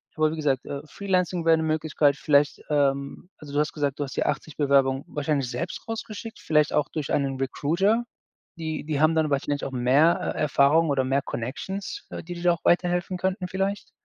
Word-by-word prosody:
Aber 155 Hz, 0 st, +2 dB
wie -, -, -4 dB
gesagt, 140 Hz, -3 st, 0 dB
äh, 140 Hz, 0 st, -5 dB
Freelancing 180 Hz, -3 st, -1 dB
wäre 165 Hz, 0 st, +6 dB
'ne 160 Hz, -, -1 dB
Möglichkeit. 155 Hz, -2 st, +1 dB
Vielleicht, 145 Hz, -1 st, +2 dB
ähm 140 Hz, +3 st, 0 dB
also, 145 Hz, -2 st, -11 dB
du 145 Hz, -, +1 dB
hast 150 Hz, -, +1 dB
gesagt, 145 Hz, -2 st, -2 dB
du -, -, 0 dB
hast 140 Hz, 0 st, -7 dB
ja -, -, +1 dB
80 155 Hz, -, -3 dB
Bewerbungen 135 Hz, -2 st, +3 dB
wahrscheinlich 145 Hz, -4 st, -1 dB
selbst 170 Hz, +6 st, -5 dB
rausgeschickt, 225 Hz, -1 st, -6 dB
vielleicht 150 Hz, -2 st, +2 dB
auch 150 Hz, -, +2 dB
durch 150 Hz, -3 st, -3 dB
einen 135 Hz, -2 st, 0 dB
Recruiter? 175 Hz, -, +1 dB, 0.6 s
Die 160 Hz, -2 st, -4 dB
die 150 Hz, -2 st, -2 dB
haben 155 Hz, +1 st, +4 dB
dann 155 Hz, -2 st, +1 dB
wahrscheinlich 140 Hz, +1 st, -1 dB
auch -, -, -4 dB
mehr, 135 Hz, +6 st, +3 dB, 0.2 s
äh, -, -, -4 dB
Erfahrung 150 Hz, +2 st, +3 dB
oder 135 Hz, -2 st, +1 dB
mehr 135 Hz, +1 st, +1 dB
Connections, 190 Hz, -, -5 dB
äh, -, -, -6 dB
die 175 Hz, +1 st, -7 dB
dir 170 Hz, -, -8 dB
da 175 Hz, -, +4 dB
auch 170 Hz, -, -13 dB
weiterhelfen 175 Hz, +1 st, +2 dB
könnten 185 Hz, +1 st, -2 dB
vielleicht. 195 Hz, +2 st, -2 dB
155 Hz, 200 wpm, -25 LUFS, 140-175 Hz, 0.6 s, wäre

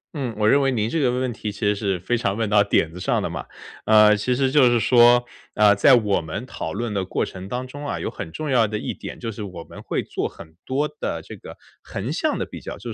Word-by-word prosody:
嗯， 130 Hz, -6 st, -3 dB
我 105 Hz, 0 st, +2 dB
认 140 Hz, +4 st, +5 dB
为 135 Hz, -, +2 dB
您 110 Hz, -3 st, 0 dB
这 165 Hz, -, 0 dB
个 130 Hz, -4 st, +2 dB
问 125 Hz, +1 st, -1 dB
问 130 Hz, -2 st, -1 dB
题 105 Hz, -1 st, -5 dB
其 100 Hz, -, -13 dB
实 105 Hz, 0 st, +2 dB
是 100 Hz, -3 st, -1 dB
非 120 Hz, +7 st, -1 dB
常 100 Hz, -2 st, -1 dB
问 110 Hz, -2 st, 0 dB
到 105 Hz, 0 st, +4 dB
点 80 Hz, -4 st, +1 dB
子 90 Hz, -, -8 dB
上 -, -, 0 dB
的 -, -, -1 dB
嘛。 -, -, -6 dB, 0.4 s
呃， 105 Hz, -1 st, +6 dB
其 125 Hz, +4 st, 0 dB
实 135 Hz, 0 st, +1 dB
就 135 Hz, -3 st, +5 dB
是 120 Hz, -1 st, +2 dB
说， 120 Hz, +1 st, +5 dB, 0.3 s
呃， 105 Hz, -1 st, +6 dB
在 130 Hz, +7 st, +6 dB
我 105 Hz, -4 st, +1 dB
们 80 Hz, -1 st, -6 dB
讨 80 Hz, -, -6 dB
论 115 Hz, +3 st, -3 dB
的 95 Hz, -2 st, -1 dB
过 95 Hz, -, -2 dB
程 95 Hz, +1 st, -9 dB
当 125 Hz, +1 st, -3 dB
中 145 Hz, +3 st, -8 dB
啊， -, -, -3 dB
有 -, -, -3 dB
很 80 Hz, -, -7 dB
重 155 Hz, -, -4 dB
要 115 Hz, -4 st, +4 dB
的 105 Hz, -, -3 dB
一 -, -, -4 dB
点 -, -, -9 dB
就 115 Hz, -, -4 dB
是 105 Hz, -, -8 dB
我 90 Hz, -5 st, -7 dB
们 -, -, -12 dB
会 -, -, -2 dB
做 -, -, -3 dB
很 80 Hz, 0 st, -14 dB
多 145 Hz, +3 st, 0 dB
的 150 Hz, -, -5 dB
这 -, -, -10 dB
个 -, -, -12 dB, 0.3 s
横 115 Hz, +9 st, -4 dB
向 300 Hz, -, 0 dB
的 -, -, -2 dB
比 -, -, -10 dB
较， -, -, -7 dB
就 -, -, -7 dB
110 Hz, 295 characters per minute, -22 LUFS, 100-130 Hz, 0.4 s, 呃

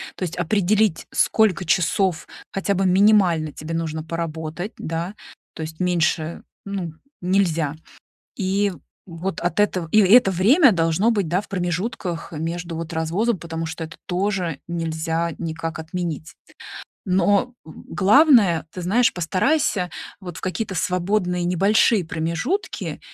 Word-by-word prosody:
То -, -, -5 dB
есть 180 Hz, -1 st, -4 dB
определить, 200 Hz, +1 st, +1 dB
сколько 185 Hz, +4 st, +2 dB
часов 175 Hz, 0 st, +1 dB, 0.2 s
хотя 195 Hz, +1 st, -1 dB
бы 195 Hz, +1 st, +1 dB
минимально 185 Hz, -5 st, +4 dB
тебе 155 Hz, +2 st, -6 dB
нужно 160 Hz, -1 st, -3 dB
поработать, 165 Hz, +3 st, -4 dB
да, 165 Hz, +4 st, -4 dB, 0.4 s
то -, -, -8 dB
есть 160 Hz, 0 st, -8 dB
меньше, 170 Hz, -2 st, 0 dB, 0.2 s
ну, 190 Hz, -5 st, -4 dB, 0.3 s
нельзя. 170 Hz, -5 st, +1 dB, 0.6 s
И 195 Hz, +1 st, 0 dB, 0.3 s
вот 175 Hz, +1 st, -5 dB
от 175 Hz, +2 st, -1 dB
этого 185 Hz, -5 st, +1 dB
и 215 Hz, -, +6 dB
это 205 Hz, +2 st, +6 dB
время 240 Hz, -, +5 dB
должно 165 Hz, +4 st, +2 dB
быть, 200 Hz, -6 st, 0 dB
да, 175 Hz, +4 st, +1 dB
в -, -, -16 dB
промежутках 180 Hz, -1 st, -3 dB
между, 165 Hz, +2 st, -4 dB
вот, 165 Hz, +1 st, -5 dB
развозом, 180 Hz, +8 st, 0 dB
потому 165 Hz, -1 st, -5 dB
что 160 Hz, +1 st, -5 dB
это 160 Hz, +2 st, -9 dB
тоже 180 Hz, -4 st, -1 dB
нельзя 165 Hz, 0 st, -2 dB
никак 165 Hz, 0 st, -4 dB
отменить. 160 Hz, -1 st, -5 dB, 0.8 s
Но 200 Hz, +6 st, +2 dB
главное, 200 Hz, -, +3 dB
ты 180 Hz, -, -7 dB
знаешь, 225 Hz, +8 st, +2 dB
постарайся, 185 Hz, -, +1 dB, 0.3 s
вот, 180 Hz, -4 st, -8 dB
в -, -, -8 dB
какие-то 190 Hz, +2 st, -3 dB
свободные 180 Hz, 0 st, 0 dB
небольшие 195 Hz, +3 st, +3 dB
промежутки, 170 Hz, -, -3 dB
180 Hz, 130 wpm, -22 LUFS, 165-200 Hz, 0.8 s, и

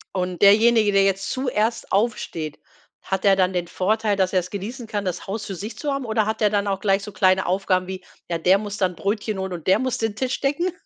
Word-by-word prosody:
Und 180 Hz, -1 st, -2 dB
derjenige, 215 Hz, +1 st, +5 dB
der 195 Hz, 0 st, +4 dB
jetzt 195 Hz, 0 st, 0 dB
zuerst 240 Hz, -3 st, -1 dB
aufsteht, 190 Hz, -8 st, -1 dB, 0.4 s
hat 190 Hz, -1 st, -3 dB
er 195 Hz, -1 st, +6 dB
dann 185 Hz, -1 st, +1 dB
den 175 Hz, -1 st, -2 dB
Vorteil, 210 Hz, +3 st, 0 dB
dass 190 Hz, -1 st, 0 dB
er's 185 Hz, -1 st, 0 dB
genießen 220 Hz, +5 st, -6 dB
kann, 205 Hz, -2 st, -3 dB
das 180 Hz, -, -4 dB
Haus 205 Hz, +2 st, -4 dB
für 195 Hz, -, -5 dB
sich 210 Hz, +6 st, -7 dB
zu 295 Hz, -, -2 dB
haben 275 Hz, -2 st, -3 dB
oder 220 Hz, -1 st, +1 dB
hat 220 Hz, +1 st, -3 dB
er 210 Hz, -, +4 dB
dann 205 Hz, 0 st, 0 dB
auch 195 Hz, -1 st, -1 dB
gleich 195 Hz, -1 st, +2 dB
so 210 Hz, -, -7 dB
kleine 185 Hz, -1 st, +2 dB
Aufgaben 185 Hz, 0 st, 0 dB
wie: 185 Hz, -1 st, -6 dB, 0.2 s
„Ja, 170 Hz, -, -1 dB
der 180 Hz, +4 st, +4 dB
muss 205 Hz, 0 st, -5 dB
dann 185 Hz, -3 st, 0 dB
Brötchen 210 Hz, +1 st, -2 dB
holen 190 Hz, -1 st, -3 dB
und 170 Hz, -1 st, -8 dB
der 190 Hz, -, +5 dB
muss 255 Hz, -1 st, -1 dB
den 225 Hz, -2 st, -1 dB
Tisch 260 Hz, +4 st, -2 dB
decken?” 295 Hz, +7 st, 0 dB
200 Hz, 240 wpm, -23 LUFS, 185-220 Hz, 0.4 s, er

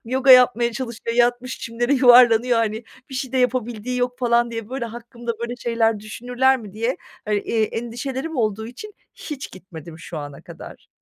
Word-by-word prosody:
yoga 260 Hz, +3 st, +2 dB
yapmaya 245 Hz, -2 st, +6 dB
çalışıyor; 235 Hz, -1 st, -5 dB
yatmış 245 Hz, +1 st, +1 dB
çimlere, 240 Hz, +3 st, -2 dB
yuvarlanıyor.", 245 Hz, -2 st, +6 dB
hani, 220 Hz, 0 st, -1 dB, 0.3 s
"Bir -, -, -7 dB
şey 265 Hz, -1 st, -4 dB
de 260 Hz, -, +1 dB
yapabildiği 250 Hz, -1 st, -1 dB
yok." 250 Hz, 0 st, -1 dB
falan 235 Hz, -1 st, +2 dB
diye, 230 Hz, -2 st, -6 dB
böyle, 260 Hz, -1 st, -4 dB
hakkımda, 235 Hz, +1 st, -6 dB
böyle 235 Hz, +1 st, -4 dB
şeyler 225 Hz, -3 st, 0 dB
düşünürler 245 Hz, +5 st, +1 dB
mi 210 Hz, -5 st, -11 dB
diye, 230 Hz, +5 st, -2 dB, 0.3 s
ııı, 210 Hz, -, +2 dB
eee, 220 Hz, +2 st, 0 dB
endişelerim 260 Hz, +7 st, -5 dB
olduğu 220 Hz, -2 st, -1 dB
için 390 Hz, -, -10 dB, 0.2 s
hiç 285 Hz, -4 st, -7 dB
gitmedim 170 Hz, -3 st, -11 dB
şu 165 Hz, -1 st, -7 dB
ana 145 Hz, -1 st, -8 dB
kadar. -, -, -12 dB
240 Hz, 170 wpm, -22 LUFS, 225-250 Hz, 0.3 s, yapmaya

